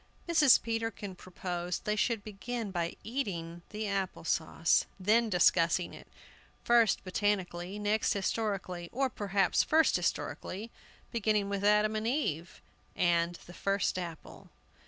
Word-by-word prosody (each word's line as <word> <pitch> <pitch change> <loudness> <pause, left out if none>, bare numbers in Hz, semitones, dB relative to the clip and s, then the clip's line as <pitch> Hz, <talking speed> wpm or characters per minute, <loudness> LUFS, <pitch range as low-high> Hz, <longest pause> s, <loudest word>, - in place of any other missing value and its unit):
Mrs. 310 -7 +6
Peterkin 225 -3 -3
proposed 180 -1 -5
they 210 - +1
should 225 -1 0
begin 215 +1 -5
by 170 -2 -2
eating 175 -9 -4
the 215 0 -4
apple 195 -4 -2
sauce, 165 0 +1
then 220 +4 +3
discussing 175 -2 +3
it, - - -12 0.6
first 235 -3 +4
botanically, 185 -1 -1
next 210 +1 +1
historically; 195 -4 -2
or 265 0 0
perhaps 200 -1 +1
first 320 0 +3
historically, 215 +5 -3 0.4
beginning 215 -3 +1
with 200 0 -2
Adam 210 +1 +4
and 215 +1 -1
Eve, 195 - -2 0.3
and 170 0 +2
the 175 - -12
first 195 0 0
apple. 170 -3 -8
200 Hz, 125 wpm, -31 LUFS, 180-220 Hz, 0.6 s, Mrs